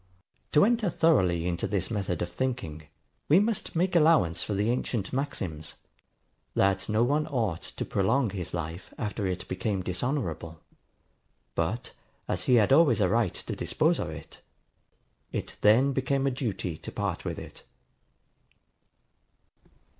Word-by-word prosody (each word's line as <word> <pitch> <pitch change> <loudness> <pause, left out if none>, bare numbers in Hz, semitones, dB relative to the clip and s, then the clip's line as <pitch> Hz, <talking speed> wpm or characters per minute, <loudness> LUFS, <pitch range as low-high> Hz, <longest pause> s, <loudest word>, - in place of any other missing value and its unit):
To 150 - +6
enter 230 -3 +2
thoroughly 95 - +3
into 85 -1 -1
this 100 +1 -1
method 95 -6 -1
of 85 - -5
thinking, 85 -13 -3 0.4
we 160 +6 +7
must 210 -3 -1
make 180 +2 +1
allowance 150 - +4
for 105 - -2
the 105 +4 +1
ancient 120 -5 -2
maxims, 95 - -3 0.8
that 100 +1 +2
no 110 +2 +3
one 150 +5 +1
ought 110 - -1
to - - -6
prolong 105 +4 +1
his 95 -3 -5
life 85 +1 -5
after 105 -2 -2
it 90 -1 -3
became 95 +1 -2
dishonourable; 90 - -3 0.9
but, 85 +9 -2 0.3
as - - -2
he 125 - +5
had 110 +2 +5
always 140 -6 +5
a 95 -3 +3
right 115 -4 +1
to - - -5
dispose - - +1
of - - -2
it, - - -10 0.9
it - - -5
then 125 +7 +5
became 135 +1 0
a 135 - +2
duty 105 - -3
to - - -7
part - - -3
with - - -4
it. - - -10
110 Hz, 145 wpm, -28 LUFS, 90-135 Hz, 0.9 s, we